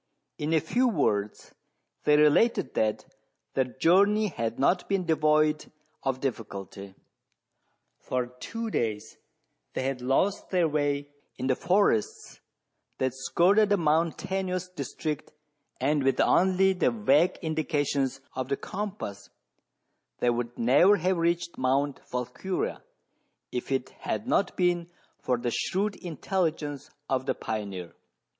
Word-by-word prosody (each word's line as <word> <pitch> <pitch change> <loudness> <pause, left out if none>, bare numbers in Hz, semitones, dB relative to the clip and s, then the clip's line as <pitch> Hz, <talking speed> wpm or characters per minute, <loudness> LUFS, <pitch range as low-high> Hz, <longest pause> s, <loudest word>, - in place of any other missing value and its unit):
In 150 +1 -2
a 160 - +4
few 245 - +1
words 105 - -1 0.5
they 150 0 +5
related 150 - +3
that 110 -1 0 0.5
their 130 - +2
journey 200 +11 +3
had 115 -8 -3
not 175 +7 +1
been 195 -2 +1
devoid 155 -1 +2 0.3
of 135 -1 -1
difficulty. 100 -6 -5 1.0
Foi 125 -1 -2
two 230 - -4
days 105 - -2 0.5
they - - -2
had 135 -1 -2
lost 135 +11 +1
their 180 -3 +2
way 145 -1 -1 0.3
in - - -3
the 130 -1 +2
forests 180 - +1 0.6
that 130 -1 0
skirted 185 +10 +3
the 205 - +4
mountainous 180 +3 0
district, 155 -4 -5 0.5
and 145 +3 +2
with 135 0 +2
only 190 +1 +4
the 180 -7 +2
vague 135 - +3
indica 155 -2 0
tions 135 -2 -1
of 130 0 -4
the 140 - 0
compass 200 - -6 0.9
they 120 - +2
would 120 0 -3
never 145 - +5
have 185 +1 +1
reached 170 0 0
Mount 135 +2 +1
Volquiria, 125 +10 -3 0.7
if 125 +2 -4
it 130 -1 0
had 220 - -3
not 200 -7 +1
been 175 -1 +1 0.3
for 125 - 0
the 120 0 -2
shrewd 200 - -1
intelligence 160 -4 -2 0.2
of 130 0 -1
the - - +1
pioneer. 100 -5 -5
150 Hz, 125 wpm, -28 LUFS, 130-180 Hz, 1.0 s, they